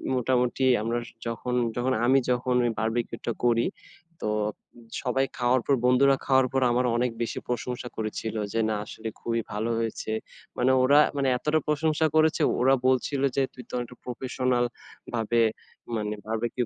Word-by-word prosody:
মোটামুটি 125 +1 +1 0.2
আমরা 115 +2 -1 0.3
যখন 120 +2 -3 0.2
যখন 130 +2 +1
আমি 135 +2 +5
যখন 125 0 +1
ওই 120 - +2
বারবিকিউটা 115 +1 -2
করি, 115 -1 +3 0.6
তো 105 - -1 0.7
সবাই 135 +2 +1
খাওয়ার 125 0 +2
পর, 140 - +3
বন্ধুরা 135 +2 +5
খাওয়ার 130 -1 +4
পর 135 - +2
আমার 125 +1 +2
অনেক 125 0 +1
বেশি 115 - -2
প্রশংসা 125 +1 -3
করেছিল 110 0 -3 0.2
যে 115 - +1
না 110 - 0
আসলে 110 +1 -8
খুবই 115 0 -1
ভালো 110 +3 -1
হয়েছে। 115 -1 -3 0.5
মানে 130 +2 +3
ওরা 140 +3 +6 0.2
মানে 135 -1 +1
এতটা 150 +4 +1
প্রশংসা 155 +1 +1
করেছে 155 0 +3 0.2
ওরা 135 +2 +5
বলছিলো 135 +2 +1
যে 135 - +3
"তুই 125 - -10
তো - - -14
অনেকটা 120 0 -5
প্রফেশনাল 125 0 0 0.5
ভাবে 115 0 +1 0.5
মানে 105 -1 -2
বারবিকিউ 115 +2 -1
125 Hz, 155 wpm, -26 LUFS, 115-130 Hz, 0.7 s, ওরা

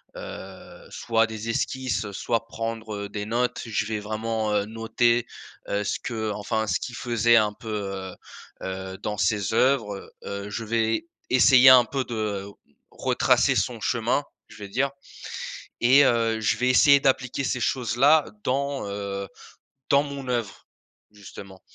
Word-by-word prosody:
heu, 95 0 -10
soit 115 -1 +1
des 110 +1 -6
esquisses, 125 -2 -1
heu, 100 - -7
soit 115 +3 -2
prendre, 115 -1 -5
heu, - - -8
des 105 0 -5
notes. 120 +3 -1
Je 110 -2 -1
vais 110 -1 -2
vraiment, 110 0 -2
heu, 100 -1 +1
noter, 115 +2 +1 0.4
heu, 100 +1 0
ce 100 - -1
que 110 -3 -3
enfin, 110 +1 -2
ce 90 - 0
qu'il 125 - -6
faisait 120 -1 +2
un 105 -1 +2
peu, 110 - -10
heu 95 -3 -4 0.5
heu, 95 0 -5
dans 105 -1 -4
ses 100 +2 0
oeuvres, 115 -6 +1
heu, 100 0 -5
je 115 +2 -4
vais 115 +4 0 0.2
essayer 130 0 +7
un 125 -2 +8
peu 135 +2 -2
de 105 -4 -3 0.5
retracer - - +2
son 120 -3 -1
chemin, 120 +4 0 0.2
je - - -15
vais 100 -2 -8
dire 135 +6 0 0.9
et 135 +4 +6
heu, 115 -2 +2
je 110 - +1
vais 125 +1 +1
essayer 140 +2 +6
d'appliquer 135 0 0
ces 125 -1 -1
choses-là 135 +6 +3 0.2
dans, 140 -2 -1
heu, 100 -1 -4 0.6
dans 140 - +5
mon 140 -2 -7
oeuvre, 115 -5 -3 0.5
justement. 100 -2 -12
115 Hz, 155 wpm, -25 LUFS, 105-125 Hz, 0.9 s, un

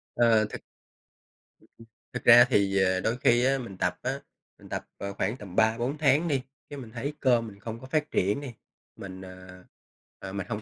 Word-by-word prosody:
Ờ, 115 -2 +4
thực - - -7 1.5
Thực - - -5
ra 120 +1 +9
thì, 100 -4 +2
ờ, 95 0 +2
đôi 115 +5 -1
khi 120 0 +3
á 135 +1 +3
mình 115 -7 -8
tập 90 0 -1
á, 135 +2 -2 0.4
mình - - -16
tập, - - -4
ờ, 100 0 -5
khoảng 105 +5 -2
tầm 95 -3 -10
3-4 120 +6 +1
tháng 150 +3 +3
đi, 140 -4 0 0.3
cái 145 - -7
mình 115 -4 -10
thấy 130 +6 -4
cơ 125 -3 +3
mình 105 -3 -9
không 115 +1 -7
có 130 - -11
phát 155 +1 -1
triển 100 +9 +1
đi, 130 -5 -7 0.4
mình, 95 -1 -9
à, 95 0 -12 0.6
à, 95 - -7
mình 100 -1 -5
hông 105 - -3
115 Hz, 200 wpm, -27 LUFS, 95-130 Hz, 1.5 s, ra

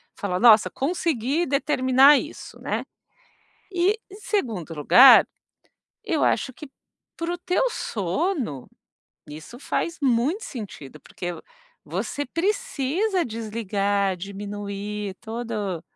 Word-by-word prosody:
fala: 185 -3 -2
"Nossa, 225 -1 +6
conseguir 300 0 -1
determinar 275 0 +5
isso", - - -9
né. - - -2 0.9
E, 375 +5 +2
em 395 - -11
segundo 220 - -2
lugar, 245 - +8 0.8
eu - - 0
acho 260 - +1
que 300 +3 -10 0.5
para 335 +1 -3
o 350 - -4
teu 365 +8 0
sono 225 - -2 0.6
isso 155 +11 -10
faz 335 +4 -3
muito 270 - +1
sentido, 170 - -9
porque 175 -1 -6 0.5
você 290 - -4
precisa 375 - -1
desligar, 205 -3 -1
diminuir 200 +1 -6
todo 220 -6 -4
235 Hz, 100 wpm, -24 LUFS, 200-320 Hz, 0.9 s, lugar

